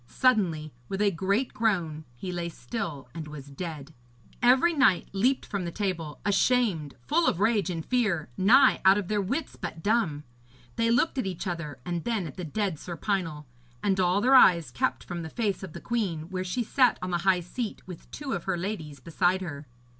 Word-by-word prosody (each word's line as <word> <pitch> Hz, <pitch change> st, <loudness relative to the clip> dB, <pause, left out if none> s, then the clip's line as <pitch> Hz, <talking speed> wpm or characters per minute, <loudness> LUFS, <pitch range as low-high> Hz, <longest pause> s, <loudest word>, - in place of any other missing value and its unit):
Suddenly, 175 Hz, -, +1 dB, 0.2 s
with 195 Hz, -, -3 dB
a 205 Hz, -1 st, +3 dB
great 195 Hz, +8 st, 0 dB
groan, 170 Hz, -9 st, 0 dB
he 180 Hz, +10 st, -5 dB
lay 175 Hz, -1 st, -3 dB
still 165 Hz, -, -5 dB
and 160 Hz, -2 st, -6 dB
was 145 Hz, -2 st, -9 dB
dead. 155 Hz, -1 st, -7 dB, 0.5 s
Every 255 Hz, +8 st, +5 dB
knight 260 Hz, -, +3 dB
leaped 245 Hz, +7 st, +1 dB
from 200 Hz, -3 st, -3 dB
the 170 Hz, -, -4 dB
table, 170 Hz, -7 st, -3 dB
ashamed, 205 Hz, -, +2 dB
full 330 Hz, +3 st, +2 dB
of 170 Hz, -, +1 dB
rage 205 Hz, -3 st, +2 dB
and 165 Hz, -3 st, -4 dB
fear, 210 Hz, -11 st, +1 dB
nigh 255 Hz, +8 st, +5 dB
out 190 Hz, +1 st, +6 dB
of 200 Hz, -4 st, -3 dB
their 210 Hz, -1 st, +1 dB
wits, 265 Hz, -, -3 dB
but 165 Hz, -2 st, -6 dB
dumb. 200 Hz, -10 st, +1 dB, 0.5 s
They 230 Hz, 0 st, +1 dB
looked 250 Hz, +4 st, +2 dB
at 210 Hz, -, -1 dB
each 185 Hz, 0 st, -4 dB
other 165 Hz, -6 st, -4 dB
and 175 Hz, -2 st, -3 dB
then 225 Hz, -6 st, -1 dB
at 150 Hz, -, -8 dB
the 180 Hz, -, -6 dB
dead 180 Hz, 0 st, -2 dB
Sir 175 Hz, -2 st, -7 dB
Pinel, 165 Hz, -5 st, -2 dB, 0.4 s
and 195 Hz, -2 st, +1 dB
all 185 Hz, +2 st, +3 dB
their 260 Hz, +4 st, +4 dB
eyes 170 Hz, -, +6 dB
kept -, -, -1 dB
from 175 Hz, -1 st, -5 dB
the 160 Hz, -, -6 dB
face 205 Hz, +1 st, -1 dB
of 190 Hz, -5 st, -8 dB
the -, -, -7 dB
queen, 180 Hz, -9 st, -2 dB
where 185 Hz, 0 st, -2 dB
she 185 Hz, +7 st, -2 dB
sat 250 Hz, +1 st, +3 dB
on 180 Hz, -, -3 dB
the 175 Hz, -, +1 dB
high 185 Hz, +1 st, +3 dB
seat, 215 Hz, +6 st, -5 dB
with 180 Hz, -3 st, -10 dB
two 290 Hz, -2 st, -5 dB
of 175 Hz, -3 st, -4 dB
her 190 Hz, -2 st, 0 dB
ladies 170 Hz, -7 st, -5 dB
beside 175 Hz, +6 st, +1 dB
her. 150 Hz, -5 st, -6 dB
185 Hz, 200 wpm, -27 LUFS, 165-220 Hz, 0.5 s, out